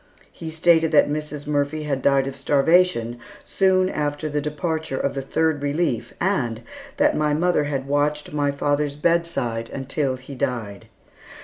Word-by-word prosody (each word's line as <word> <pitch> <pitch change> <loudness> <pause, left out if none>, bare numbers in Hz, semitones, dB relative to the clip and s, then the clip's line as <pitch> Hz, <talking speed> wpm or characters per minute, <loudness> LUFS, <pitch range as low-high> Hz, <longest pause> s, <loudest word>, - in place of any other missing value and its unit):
He 165 - -7
stated 160 0 +3
that 145 -1 +5
Mrs. 150 -1 -4
Murphy 145 +1 -1
had 140 -3 -2
died 135 0 +3
of 135 -1 -5
starvation 140 -5 +2 0.3
soon 185 -1 +2
after 150 -3 -2
the 150 0 -1
departure 155 -1 -3
of 140 - -1
the 135 - -3
"Third 155 +2 0
Relief," 145 -5 -1
and 125 - 0 0.4
that 295 +1 +3
my 150 -1 +1
mother 170 -2 +2
had 135 -2 -2
watched 150 +1 0
by 145 -1 +1
father's 145 0 0
bedside 150 -8 0
until 135 0 -2
he 130 +2 -11
died. 115 -6 -4
145 Hz, 150 wpm, -23 LUFS, 135-160 Hz, 0.4 s, that